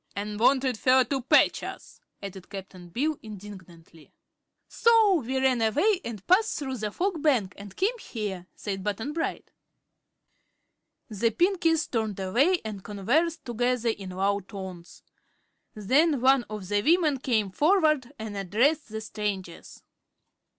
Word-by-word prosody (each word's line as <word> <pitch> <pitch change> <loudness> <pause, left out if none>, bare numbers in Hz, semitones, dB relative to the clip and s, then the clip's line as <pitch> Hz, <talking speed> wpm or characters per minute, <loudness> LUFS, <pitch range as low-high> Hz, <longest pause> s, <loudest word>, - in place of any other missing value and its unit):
"An' 210 +1 -4
wanted 255 -1 +2
fer 260 0 +5
to 265 +2 -2
patch 245 - +4
us," - - -9 0.2
added 190 -2 -8
Cap'n 190 -3 -9
Bill, 290 - -1
indignantly. 185 -6 -12 0.6
"So 440 -7 +4
we 260 +3 -2
ran 260 -2 +2
away 330 - +2
and 215 -5 -7
passed 430 +5 +3
through 265 -3 -4
the 215 -1 -3
Fog 350 - -2
Bank 245 -12 +2
and 200 -1 -11
came 460 +6 0
here," 200 - -5
said 195 -2 -5
Button 220 +8 -3
Bright. 330 +1 -4 1.6
The 220 +2 +1
Pinkies 335 - +2
turned 220 -5 -2
away 265 - +2
and 205 -3 -6
conversed 275 - 0
together 245 0 0
in 200 -4 -4
low 195 +2 0
tones. 190 -3 -10 0.7
Then 275 - +2
one 260 0 +4
of 210 -3 -6
the 205 +1 +1
women 310 - +3
came 220 -7 0
forward 305 - +2
and 220 -2 -6
addressed 230 - +1
the 220 0 -5
strangers. 205 -5 -5
230 Hz, 135 wpm, -27 LUFS, 200-295 Hz, 1.6 s, fer